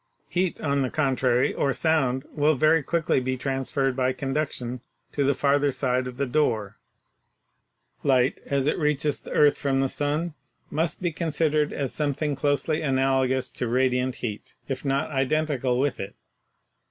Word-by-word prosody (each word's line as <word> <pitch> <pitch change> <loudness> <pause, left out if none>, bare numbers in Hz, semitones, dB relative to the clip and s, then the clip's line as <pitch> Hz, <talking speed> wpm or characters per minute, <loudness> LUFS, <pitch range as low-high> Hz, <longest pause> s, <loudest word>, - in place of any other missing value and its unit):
Heat, 180 0 0
on 140 -2 +1
the 130 - 0
contrary, 130 -4 +1
or 140 - 0
sound 135 -5 +1
will 150 0 +3
very 155 +3 +4
quickly 165 0 +1
be 130 0 -2
transferred 135 0 -1
by 130 0 +1
conduction 130 -2 -3 0.3
to 145 - 0
the 140 0 +2
farther 145 +1 +2
side 130 -1 0
of 125 -1 -8
the 140 - 0
door. 110 -7 0 1.2
Light 130 -2 +2
as 140 -1 +1
it 150 - +1
reaches 150 -1 +1
the - - -12
earth 145 -1 +4
from 135 -1 +1
the 135 - +2
sun 150 +5 -1 0.4
must 160 +3 -1
be 175 - +1
considered 155 -2 0
as 140 -2 -3
something 150 0 -1
close 145 +1 0
ly 155 -1 +1
analogous 130 -2 +1
to 125 - -3
radiant 125 +1 +1
heat, 105 -4 -6
if 135 - -4
not 140 +2 0
identical 135 -2 0
with 140 +1 0
it. 95 - -6
140 Hz, 160 wpm, -25 LUFS, 130-150 Hz, 1.2 s, very